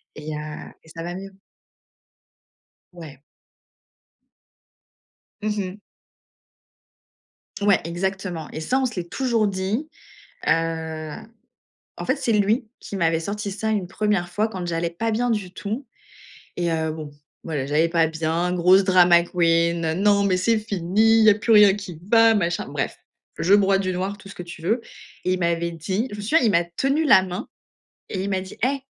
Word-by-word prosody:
Et 150 0 -6
heu, - - -4 0.4
et 160 - -19
ça 165 +1 -8
va 175 +1 -5
mieux. 195 +1 -8 1.6
Ouais. 155 -6 -11 2.2
Mmh 215 - -1
mh. 190 +1 -4 1.8
Ouais, 200 -1 +4
exactement 175 -1 -3
et - - -6
ça, 260 +11 +1
on 265 - +1
se 235 - -4
l'est 170 -1 -5
toujours 235 -5 +1
dit, 200 +9 -2 0.6
heu. 160 -2 -1 0.8
En - - -4
fait, 265 - +1
c'est 265 -4 -1
lui 215 +4 +2
qui 200 - -8
m'avait 165 -3 +1
sorti 200 +4 -4
ça 220 +3 -3
une 200 -5 -1
1re 195 -3 -1
fois 215 +4 0
quand 185 -5 -6
j'allais 170 0 -1
pas 225 +7 -2
bien 240 +2 0
du 195 -5 -2
tout 220 +8 -5 0.7
et 175 -1 0
heu, 160 -1 -1
bon, 155 -2 -7 0.3
voilà, 150 -5 -3
j'allais 155 +3 +2
pas 165 -1 +3
bien 160 +2 -1
grosse 180 +2 +5
drama 175 -2 +6
queen. 170 -1 +1
Non 200 +2 +3
mais 185 -2 +2
c'est 220 +5 +2
fini, 215 +2 +2
il - - +5
y 215 - +8
a - - +5
plus 225 +2 0
rien 210 -2 +8
qui 190 -6 -8
va 225 -1 +6
machin, 175 -4 -1
bref. - - -3 0.4
Je 190 +4 +4
broie 195 -1 +4
du 185 -1 -1
noir, 195 +3 -3
tout 195 - -13
ce - - -10
que - - -7
tu 170 -1 -10
veux 220 +8 0 0.4
et 185 - +1
il 185 - 0
m'avait 170 -1 0
dit 190 - -2
je 205 - -7
me - - -7
souviens 265 +11 +3
il 220 - +4
m'a 175 -2 +3
tenu 270 - 0
la 190 -8 +7
main, 180 -1 -5 0.6
et 190 -1 -3
il 200 - -3
m'a 190 -1 0
dit: 190 - -10
«Hey 275 +1 +1
185 Hz, 175 wpm, -23 LUFS, 170-210 Hz, 2.2 s, y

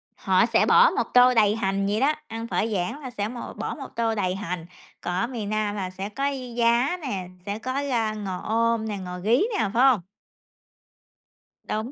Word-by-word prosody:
họ - - +3
sẽ - - +3
bỏ - - +7
một - - -1
tô 250 0 +7
đầy 215 -3 +4
hành 195 -2 0
vậy 205 +2 0
đó, 290 +4 +3
ăn 225 -2 -5
phở 220 - 0
Giảng 185 +8 -2
là 260 - -6
sẽ 210 -4 -3
một 240 +2 -7
bỏ - - -3
một 275 -4 -8
tô 230 -1 0
đầy 185 -3 0
hành, 180 -4 -4 0.4
còn 180 - -3
ở 190 +6 0
miền 230 -5 -5
Nam 215 -1 -1
là 190 -3 -3
sẽ 190 +2 -6
có 275 +7 -1 0.3
giá 240 +7 +2
nè, 200 - -4 0.2
sẽ 205 +1 -3
có 255 +4 -2
rau 225 -4 0
ngò 195 -3 -4
om 230 0 +1
nè, 210 -2 -3
ngò 180 -1 -6
rí 220 +7 +3 0.2
nè, 220 -3 +1
phải 240 +2 +4
hông? 260 -7 +5 1.6
Đúng. 220 +4 -3
220 Hz, 205 wpm, -25 LUFS, 200-240 Hz, 1.6 s, bỏ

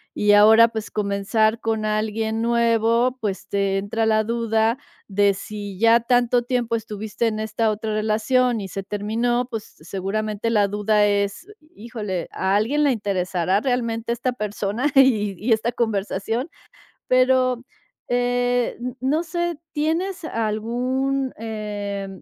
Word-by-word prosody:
y 210 0 +3
ahora, 220 +3 +7
pues, 220 -2 -6
comenzar 210 +2 0
con 220 -1 -1
alguien 220 +1 -1
nuevo, 235 +1 +2
pues, 195 -3 -3
te 195 -1 0
entra 215 +3 -1
la 215 0 +3
duda, 230 +1 0 0.3
de 200 0 +2
si 205 -1 -7
ya 230 +3 +5
tanto 245 +1 +2
tiempo 240 -1 -1
estuviste 220 0 -3
en 215 -1 -2
esta 220 +1 0
otra 215 +1 -3
relación 220 +3 +1
y 195 - -5
se 195 +1 -5
terminó, 225 +5 -1
pues, 225 -4 -4 0.2
seguramente 205 +6 -3
la 210 -3 +3
duda 210 +1 +2
es 200 - 0 0.3
"Híjole, 210 -6 -5
¿a 190 +1 0
alguien 255 +9 +1
le 285 - +4
interesará 190 -3 0
realmente 235 -2 -1
esta 240 +2 -1
persona 210 +2 -2
y 220 -7 +4
y 225 +6 +1
esta 220 +2 0
conversación?", 225 - -2 0.6
pero, 255 -1 +3 0.5
eh, 245 0 +1 0.2
no 285 +6 +1
sé, 345 0 -2 0.2
¿tienes 330 +5 -1
algún, 250 +3 -1
eh, 205 -3 -4
220 Hz, 130 wpm, -22 LUFS, 205-245 Hz, 0.6 s, ahora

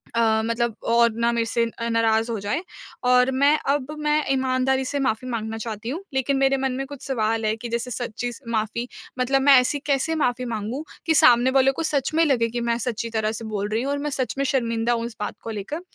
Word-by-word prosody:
अ, 220 -1 +3
मतलब 230 -1 -1
और 235 0 +4
ना 235 0 +3
मेरे 235 -1 0
से 230 +1 0
अ, 230 0 -5
नाराज़ 225 0 +2
हो 225 - -2
जाए 205 - -2 0.4
और 250 +1 +4
मैं 280 +3 +4
अब 280 0 0
मैं 300 0 +1
ईमानदारी 265 0 +1
से 285 +2 -2
माफ़ी 255 -2 -1
माँगना 225 -2 -3
चाहती 225 0 -5
हूँ, 330 +9 -4
लेकिन 265 +1 +1
मेरे 270 0 +3
मन 265 0 -1
में 270 +1 -3
कुछ 285 -1 -10
सवाल 225 -3 0
है 215 0 +1
कि 235 +1 -7
जैसे 235 +2 -3
सच्ची 245 0 -3 0.2
माफ़ी, 220 +2 -1 0.3
मतलब 270 +2 +2
मैं 280 +1 +6
ऐसी 285 +3 -1
कैसे 285 +3 +1
माफ़ी 250 -4 0
माँगूँ 230 +4 -4 0.2
कि 320 - +3
सामने 245 -2 +6
वालों 270 0 +4
को 330 - -3
सच 290 -4 0
में 325 - +4
लगे 250 -6 +2
कि 240 +1 -3
मैं 235 0 0
सच्ची 230 -1 -3
तरह 220 -1 -1
से 225 +1 -6
बोल 205 -2 -3
रही 220 +2 0
हूँ 275 - -1
और 285 - 0
मैं 295 - -2
सच 265 -2 -2
में 275 - 0
शर्मिंदा 235 -3 0
हूँ 230 -1 -1
इस 235 -1 -7
बात 210 - -3
को 230 - -6
लेकर? 220 - -5
245 Hz, 235 wpm, -23 LUFS, 225-270 Hz, 0.4 s, मैं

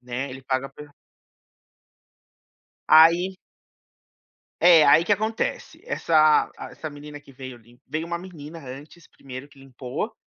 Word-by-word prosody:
né, 125 +2 -5
ele 130 +1 -10
paga 130 +1 -2
a - - -12
pe 150 - -12 2.0
Aí 170 +4 +5 1.3
É, 170 -3 +7
aí 145 +3 +6
que - - -14
que 205 - +4
acontece? 225 - -4
Essa 155 - +3
a - - -9
essa 155 - -8
menina 145 0 -11
que 140 - -18
veio 130 -1 -10
lim 120 +1 -23
veio 155 +4 -4
uma 170 0 -3
menina 170 -3 -11
antes 145 +4 -12
1º 130 0 -11
que 140 -1 -20
limpou, 135 - -6
150 Hz, 145 wpm, -23 LUFS, 130-170 Hz, 2.0 s, É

